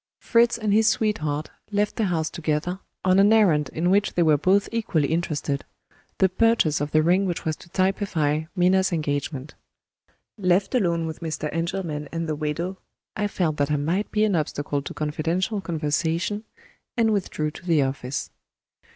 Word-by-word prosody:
Fritz 235 0 +3
and 215 -3 0
his 220 +1 +4
sweetheart 155 -10 0 0.2
left 205 0 0
the 220 - 0
house 160 -4 -1
together, 165 +3 -2 0.3
on 185 +1 +4
an 200 +2 +6
errand 170 -10 +4
in 175 +3 0
which 200 0 +2
they 175 - +3
were 155 -2 +5
both 190 +7 +2
equally 210 -11 0
interested 150 -3 -1 0.5
the 190 - +4
purchase 185 -6 +2
of 145 - -1
the 155 +1 +3
ring 185 +4 +3
which 175 - -3
was 155 -1 0
to 170 - -16
typify 175 -5 0
Minna's 190 +1 +3
engagement. 145 -3 -2 0.9
Left 185 +3 +2
alone 170 -9 +1
with 160 -1 -5
Mr. 155 -2 -3
Engelman 165 -3 -3
and 165 0 -3
the 155 - -1
widow, 165 +5 -3 0.4
I 210 -1 0
felt 165 -6 -1
that 145 0 +1
I 150 - +2
might 165 +8 -1
be 215 - +2
an 210 -3 +2
obstacle 145 -2 -1
to - - -7
confidential 165 +7 -1
conversation, 165 +5 -1 0.5
and 225 -2 +3
withdrew 155 -6 -1
to 155 - -12
the 160 -4 +4
office. 135 0 -3
170 Hz, 170 wpm, -24 LUFS, 150-195 Hz, 0.9 s, an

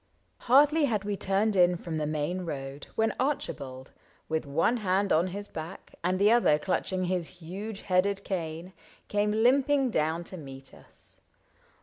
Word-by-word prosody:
Hardly 290 +4 +6
had 215 -6 -1
we 205 0 -2
turned 200 +2 +1
in 180 -1 +5
from 165 -1 -5
the 150 - -1
main 155 +5 -2
road 140 -3 -6
When 220 -1 +1
Archibald, 135 - -3 0.4
with 160 -1 -2
one 165 +12 +2
hand 200 -1 +1
on 165 +4 +3
his 200 +3 -6
back 160 +4 -8
And 180 +2 +1
the 205 +3 +4
other 235 -10 +4
clutching 185 +3 -1
his 180 -1 -2
huge 195 +5 -7
headed 195 +2 +1
cane. 170 -1 -4 0.4
Came 205 0 +1
limping 265 +4 +3
down 160 -1 0
to 185 - -9
meet 135 -3 -10
us. - - -15
185 Hz, 155 wpm, -28 LUFS, 160-210 Hz, 0.4 s, Hardly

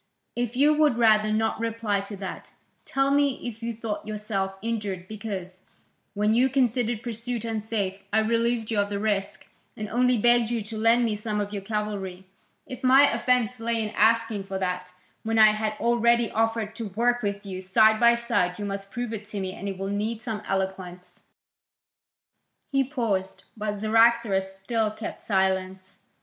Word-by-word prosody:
"If 240 0 -2
you 290 +4 +5
would 300 -5 +3
rather 215 -2 +4
not 220 +1 0
reply 225 -3 -1
to 200 +1 -7
that, 190 -1 -8 0.3
tell 270 0 +1
me 280 -1 +2
if 225 -1 -7
you 230 0 -2
thought 220 -2 -5
yourself 210 -2 -3
injured 205 -5 -3
because, 190 -4 -6 0.5
when 210 +1 +2
you 250 +3 +4
considered 240 -3 0
pursuit 235 0 -4
unsafe, 215 -3 -2
I 220 - +3
relieved 230 0 0
you 215 - +1
of 200 0 +1
the 205 - -2
risk, 200 -1 -2 0.3
and 215 - -4
only 250 +2 +2
begged 240 +1 +4
you 235 -3 -1
to 220 +2 -8
lend 230 +2 +4
me 220 -2 0
some 210 0 -3
of 205 0 -3
your 200 - -3
cavalry? 195 -3 -4 0.4
If 255 - -9
my 270 +2 +6
offence 250 -2 +1
lay 230 0 -1
in 215 -1 -2
asking 225 -1 +2
for 195 -1 -4
that, 180 -1 -3 0.3
when 225 0 -1
I 215 -1 +8
had 215 0 -2
already 235 0 +2
offered 225 -1 0
to 230 -2 -4
work 240 +5 +1
with 200 0 -3
you, 185 -1 -5
side 220 +4 +4
by 235 0 +6
side, 180 -7 0
you 205 - -4
must 195 0 -5
prove 240 0 -4
it 210 -1 -6
to 205 - -5
me; 190 -1 -3
and 200 +2 -5
it 195 - -5
will 195 +1 -4
need 215 +3 -2
some 220 -3 -4
eloquence." 190 -2 -4 1.5
He 275 -1 +3
paused, 230 -9 -2
but 210 -1 -3
Cyaxares 220 -2 +3
still 215 +3 -1
kept 215 +1 -7
silence. 190 -1 -1
215 Hz, 175 wpm, -26 LUFS, 200-235 Hz, 1.5 s, I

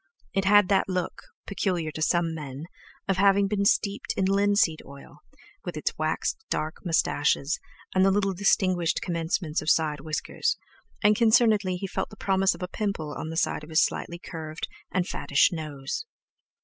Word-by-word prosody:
It 195 0 0
had 205 0 +6
that 195 -1 +2
look, 185 -1 -2 0.2
peculiar 180 -5 -1
to 155 - -7
some 165 +1 +1
men, 145 -3 -7 0.4
of 195 -1 +1
having 200 +1 +4
been 200 0 0
steeped 200 0 +1
in 190 - +2
linseed 200 -4 +2
oil, 140 0 -13 0.4
with - - -5
its - - -2
waxed 445 - -2
dark 155 +2 -3
moustaches 150 -3 +1 0.3
and 185 - +4
the 195 - +5
little 195 0 +1
distinguished 185 -2 +1
commencements 165 -2 -1
of - - -2
side 155 -3 +2
whiskers; 160 - -2 0.5
and 210 +1 +5
concernedly 220 -4 +4
he 180 - -4
felt 190 - -3
the 215 - -12
promise 195 0 +2
of - - -8
a - - -2
pimple 190 -7 -3
on 160 - -5
the 160 - -5
side 150 - 0
of 150 - -11
his 160 0 +4
slightly 170 - -5
curved 160 -3 -6 0.2
and 185 -1 0
fattish 140 - +2
nose. 155 - -5
180 Hz, 170 wpm, -26 LUFS, 160-200 Hz, 0.5 s, had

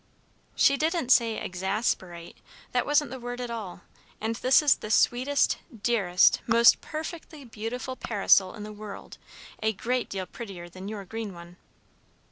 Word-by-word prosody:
"She 275 - +4
didn't 315 -3 -1
say 230 -3 +4
"exasperate." 185 -2 -3 0.4
That 245 - 0
wasn't 295 -3 +2
the 260 - -6
word 245 0 -6
at 245 -1 -4
all; 205 -7 -6 0.4
and 220 +1 -2
this 260 +5 +4
is 290 - +5
the 215 - -8
sweetest, 255 +5 +2 0.2
dearest, 195 -7 +3
most 235 0 +6
perfectly 315 -2 -7
beautiful 240 +3 -5
parasol 200 -4 +2
in 210 - -8
the 215 0 -8
world, 210 -1 -10 0.4
a 220 0 +1
great 245 +5 -2
deal 190 -1 -4
prettier 185 -5 -9
than 185 +2 -9
your 205 -2 -6
green 215 -1 -6
one." 170 +1 -12
225 Hz, 150 wpm, -27 LUFS, 195-250 Hz, 0.4 s, most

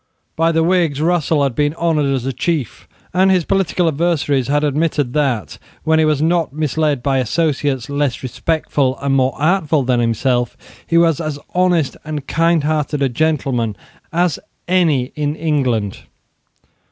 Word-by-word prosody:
By 165 +1 +2
the 165 0 +2
Whigs 170 -5 +1
Russell 160 -2 +1
had 135 -3 0
been 145 +3 0
honoured 160 -4 +1
as 130 -2 -1
a 135 - -2
chief; 140 - -3 0.3
and 190 +1 +4
his 185 -4 +2
political 185 -2 +1
adversaries 145 -4 0
had 145 +1 +1
admitted 150 -3 0
that, 130 - -1 0.2
when 160 0 +3
he 160 - +4
was 155 -1 +1
not 165 -2 +1
misled 150 -2 -1
by 135 -2 +1
associates 140 -1 0
less 140 -3 -2
respectable 135 -1 -1
and 140 -1 -1
more 130 0 +1
artful 155 -2 +2
than 125 -1 +1
himself, 120 +1 0 0.3
he 170 - +2
was 165 -2 +3
as 155 -2 -3 0.2
honest 175 -5 +1
and 150 -2 -5
kindhearted 155 -3 +1
a 135 - +2
gentleman 130 -6 0 0.4
as 175 -2 +1 0.3
any 160 -8 +2
in 150 -1 -1
England. 130 -11 -1
150 Hz, 155 wpm, -18 LUFS, 135-165 Hz, 0.4 s, and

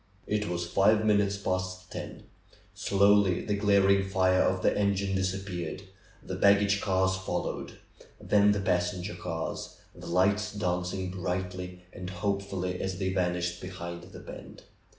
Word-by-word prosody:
It 105 -1 -1
was 85 0 -2
five 105 +5 +3
minutes 100 -1 +3
past 95 -1 -3
ten. - - -7 0.5
Slowly 100 -2 +3
the 105 - 0
glaring 100 -1 +3
fire 95 -1 +3
of 95 0 +1
the - - +3
engine 100 -1 +1
disappeared; 95 -2 -3 0.4
the - - -6
baggage 100 0 +4
cars 95 -1 +2
fol 95 - -2
lowed; - - -5 0.5
then 105 0 +4
the 105 -1 0
passenger 90 +1 0
cars, - - -5 0.2
the - - -11
lights 100 +2 +2
dancing 90 -1 -2
brightly 90 0 -4
and 90 0 -6
hopefully 95 -1 -2
as 95 -1 -2
they 95 0 -1
vanished 90 -1 -1
behind 85 -2 -6
the 95 - -11
bend. - - -11
95 Hz, 140 wpm, -29 LUFS, 90-100 Hz, 0.5 s, baggage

